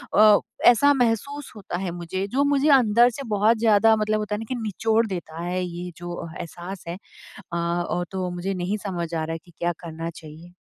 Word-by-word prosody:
अ, 210 -1 +7 0.3
ऐसा 285 +5 +6
महसूस 260 +3 -1
होता 190 -4 -5
है 185 -1 -3
मुझे, 175 +2 -4
जो 265 +7 +1
मुझे 285 +1 +2
अंदर 240 -3 +6
से 275 +3 -7
बहुत 210 +3 +3
ज़्यादा 220 0 +5
मतलब 215 0 0
होता 210 -1 -2
है - - -4
ना 225 - -6
कि - - -2
निचोड़ 225 +2 +1
देता 170 -4 -6
है 180 +1 -1
ये 175 0 -6
जो 175 -1 -6
एहसास 175 +3 -7
है। 170 - -4 0.6
अ, 170 - -1
और 175 +1 -1
तो 185 -1 -2
मुझे 180 +2 -3
नहीं 185 +3 -2
समझ 170 -3 -3
आ 160 -1 -1
रहा 165 - -4
है 165 - -3
कि 175 - -19
क्या 175 0 0
करना 165 -1 -5
चाहिए? 160 +2 -12
190 Hz, 210 wpm, -24 LUFS, 175-225 Hz, 0.6 s, अ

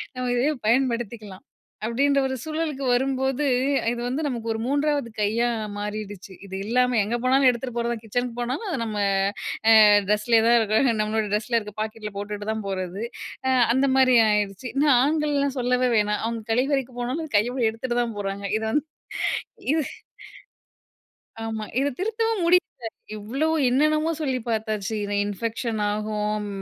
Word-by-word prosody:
நம்ம 255 0 -3
இதையே 250 +5 +2
பயன்படுத்திக்கலாம். 230 -4 -1 0.4
அப்பிடின்ற 275 +5 +2
ஒரு 265 - -3
சூழலுக்கு 310 -3 -3
வரும்போது, 265 +2 +1 0.5
இது 240 - -5
வந்து 265 +5 -2
நமக்கு 235 -4 -4
ஒரு 220 - -4
3வது 285 -1 0
கையா 230 +4 +1 0.3
மாறிடுச்சு. 205 -2 -6
இது 190 -1 -7
இல்லாம 250 +2 +2
எங்க 235 +3 -1
போனாலும் 265 +1 +4
எடுத்துட்டு 245 0 -3
போறது 235 0 0
தான். 225 - -7
கிச்சனுக்கு 245 +2 -3
போனாலும் 255 - -3
அத 320 - -2
நம்ம 215 -2 -4 0.7
அ - - +8 0.4
ட்ரெஸ்லே 220 +2 +3
தான் 235 0 +6
இருக்கும். 220 +4 +2
நம்மளோட 215 +1 0
டிரெஸ்ஸ்ல 215 +3 +1
இருக்கிற 210 -2 -5
பாக்கெட் 215 0 -5
ல 210 - -8
போட்டுட்டு 205 +1 -5
தான் 220 -1 -4
போறது. 190 +1 -4 0.4
ஆ - - +3 0.2
அந்தமாரி 265 -1 +4
ஆயிருச்சு. 210 +2 -1
இன்னும் 280 0 +4
ஆண்கள்லாம் 285 -1 +1
சொல்லவே 250 +1 +2
வேணாம். 210 0 +1
அவுங்க 230 -1 -3
கழிவறைக்கு 260 0 0
போனாலும் 280 +5 -3
கையோட 245 +5 0
எடுத்துட்டு 240 +2 -2
தான் 230 -3 -5
போறாங்க. 200 0 -4
இத 220 - -5
வந்து 295 +5 +1 0.9
இது 315 -2 +1 1.6
ஆமா. 220 -1 -4
இத 280 +1 +1
திருத்தவும் 450 +1 0
முடியல. 360 +1 +6 0.6
இவ்ளோ 235 +9 -2 0.2
என்னென்னமோ 305 +5 +2
சொல்லி 265 -5 -1
பாத்தாச்சு. 220 -1 -2
இன 205 0 -2
இன்ஃபெக்ஷன் 225 +2 -3
ஆகும். 210 0 -2
240 Hz, 145 wpm, -24 LUFS, 215-270 Hz, 1.6 s, அ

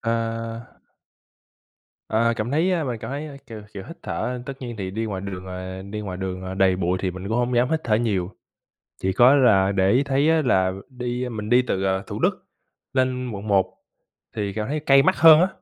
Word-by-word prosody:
Ơ. 115 0 -3 1.3
Ờ, 115 +1 +2
cảm 110 +3 -2
thấy, 160 +6 +2
ơ 170 -4 0
mình 120 -4 -3
cảm 115 +2 -7
thấy, 145 0 -6
kiểu 110 -3 -9
kiểu, 95 - -6
hít 165 - -10
thở 125 0 -3
tất 135 - -4
nhiên 120 -3 -6
thì 95 -2 -4
đi 110 +3 -3
ngoài 100 -3 -4
đường, 95 -1 -6
ờ, 95 0 -6
đi 100 +2 -6
ngoài 95 -3 -5
đường, 95 0 -4
à, 95 0 -5
đầy 95 -1 +3
bụi 90 0 0
thì 95 - 0
mình 95 +2 -7
cũng 110 - 0
hông 120 0 0
dám 125 +4 +2
hít 160 -1 +1
thở 110 - +2
nhiều, 105 -5 0 0.7
chỉ 95 0 +1
có 125 +6 +6
là 100 -8 +4
để 95 0 +2
ý 130 +5 +4
thấy 140 +3 +2
á 160 -1 +3
là 95 -7 +2 0.2
đi 125 -1 -4
mình 105 -2 -5
đi 125 +1 +5
từ, 95 -5 -2
à, 95 0 0
Thủ - - -5
Đức - - 0 0.5
lên 130 -1 0
Quận 105 0 -6
1 95 -2 +3 0.7
thì 100 -2 -2
cảm 105 0 -3
thấy 150 +1 -2
cay 135 -2 +5
mắt - - +3
hơn 155 +2 +8
á. 185 - +4
115 Hz, 225 wpm, -23 LUFS, 95-130 Hz, 1.3 s, hơn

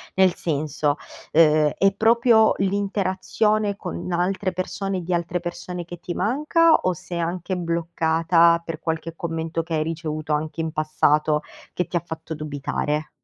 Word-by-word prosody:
Nel 190 -2 +4
senso, 150 -2 -1 0.4
uhm, 155 -2 +5
è 195 0 +3
proprio 225 0 +5
l'interazione 200 +2 0
con 85 +1 -6
altre 185 +2 0
persone 190 +2 -3
e - - -7
di 180 - -2
altre 175 +1 -1
persone, 175 0 -5
che 175 0 -9
ti 175 - -5
manca, 300 - +3
o 185 - +1
sei 175 0 -6
anche 175 +2 -2
bloccata 170 0 +2
per 165 -2 -5
qualche 165 0 -3
commento 165 0 -3
che 165 0 -6
hai 155 - +1
ricevuto, 155 -1 -4
anche 155 +2 -2
in 160 - -2
passato, 150 0 +2 0.3
che 180 - -1
ti - - -6
ha 170 - -3
fatto 160 0 -6
dubitare? 150 +1 -3
170 Hz, 155 wpm, -23 LUFS, 155-185 Hz, 0.4 s, uhm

